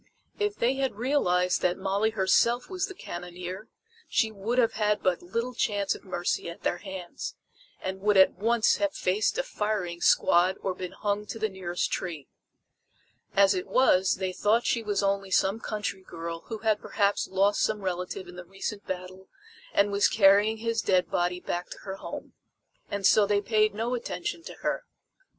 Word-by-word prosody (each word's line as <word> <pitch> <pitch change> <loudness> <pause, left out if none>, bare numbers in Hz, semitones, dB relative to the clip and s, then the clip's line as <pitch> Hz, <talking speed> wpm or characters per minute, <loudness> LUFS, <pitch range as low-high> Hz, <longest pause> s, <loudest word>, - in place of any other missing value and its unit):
If 415 0 0
they 255 +3 +1
had 270 -5 -1
realized 180 -8 +1
that 180 0 +1
Molly 195 +3 +1
herself 220 - +2
was 370 0 -1
the 385 - -9
cannoneer, 180 - -7 0.4
she 220 -2 +2
would 215 +4 -3
have 235 -3 +3
had 210 -1 0
but 185 -2 +1
little 230 +8 -3
chance 205 -4 0
of - - -11
mercy 175 -2 -2
at 170 - -10
their 175 - 0
hands, 190 -3 -7 0.4
and 190 0 -5
would 205 0 +3
at 190 - +7
once 230 +1 +2
have 300 0 -1
faced 205 - +1
a - - +1
firing 210 - -2
squad 180 +2 +4
or 190 - -1
been 180 -1 -6
hung 210 0 -2
to - - -5
the 220 0 0
nearest 180 -2 -3
tree. 160 -7 -4 1.1
As 195 0 +6
it 180 -1 -3
was 190 -7 +4
they 185 -1 -3
thought 220 +5 +2
she 235 - +1
was 205 -2 -1
only 195 0 0
some 195 +3 +2
country 205 -4 -4
girl 165 -2 -7
who 225 - -4
had 215 -1 +2
perhaps 205 -1 0
lost 195 +2 +2
some 215 -1 0
relative 180 0 -3
in 180 - -11
the 180 - -7
recent 195 +3 -6
battle 185 +1 -6 0.4
and 200 0 +3
was 200 0 +4
carrying 205 +1 +5
his 230 0 -1
dead 185 -1 +2
body 180 0 0
back 175 0 -4
to - - -8
her 195 -1 -5
home. - - -8 0.6
And 200 -1 -3
so 205 +1 +6
they 205 0 +3
paid 215 0 +2
no 230 +3 -1
attention 250 +6 -3
to - - -7
her. - - 0
200 Hz, 180 wpm, -28 LUFS, 185-220 Hz, 1.1 s, at